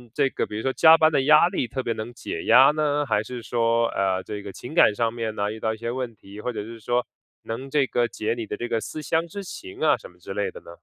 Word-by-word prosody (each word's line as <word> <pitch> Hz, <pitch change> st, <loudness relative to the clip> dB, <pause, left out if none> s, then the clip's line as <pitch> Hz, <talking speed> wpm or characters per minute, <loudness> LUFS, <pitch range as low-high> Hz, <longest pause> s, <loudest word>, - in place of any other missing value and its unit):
这 140 Hz, -2 st, +3 dB
个 -, -, -2 dB
比 -, -, -7 dB
如 -, -, -4 dB
说 135 Hz, 0 st, 0 dB
加 160 Hz, 0 st, +7 dB
班 155 Hz, 0 st, +4 dB
的 140 Hz, -3 st, +2 dB
压 150 Hz, +3 st, +6 dB
力 180 Hz, -9 st, -2 dB
特 130 Hz, +3 st, -4 dB
别 115 Hz, -, -1 dB
能 110 Hz, +2 st, -6 dB
解 -, -, -6 dB
压 135 Hz, +3 st, +7 dB
呢？ 150 Hz, -1 st, 0 dB
还 105 Hz, -5 st, +1 dB
是 120 Hz, +1 st, -7 dB
说， 115 Hz, 0 st, +1 dB
呃， 95 Hz, -1 st, 0 dB
这 105 Hz, -1 st, -6 dB
个 100 Hz, -1 st, -8 dB
情 125 Hz, +9 st, -9 dB
感 135 Hz, -10 st, +5 dB
上 115 Hz, 0 st, 0 dB
面 115 Hz, -2 st, -4 dB
呢 105 Hz, +1 st, -1 dB
遇 110 Hz, -, -7 dB
到 110 Hz, -, 0 dB
一 110 Hz, -, -5 dB
些 115 Hz, +1 st, -4 dB
问 125 Hz, -3 st, -4 dB
题， 100 Hz, +1 st, -12 dB
或 125 Hz, -, -2 dB
者 105 Hz, -3 st, -5 dB
是 115 Hz, +1 st, -10 dB
说 120 Hz, +3 st, 0 dB, 0.4 s
能 120 Hz, +4 st, -6 dB
这 140 Hz, -1 st, +2 dB
个 120 Hz, -1 st, 0 dB
解 110 Hz, 0 st, -2 dB
你 115 Hz, -2 st, -5 dB
的 -, -, -4 dB
这 120 Hz, -, -4 dB
个 115 Hz, -2 st, -1 dB
思 155 Hz, -, -6 dB
乡 165 Hz, +4 st, 0 dB
之 200 Hz, +4 st, -7 dB
情 370 Hz, -, -9 dB
啊 -, -, +4 dB
什 -, -, -12 dB
么 -, -, -23 dB
之 -, -, -8 dB
类 460 Hz, -, -1 dB
的 480 Hz, +2 st, -10 dB
呢？ -, -, -13 dB
120 Hz, 310 characters per minute, -24 LUFS, 110-150 Hz, 0.4 s, 加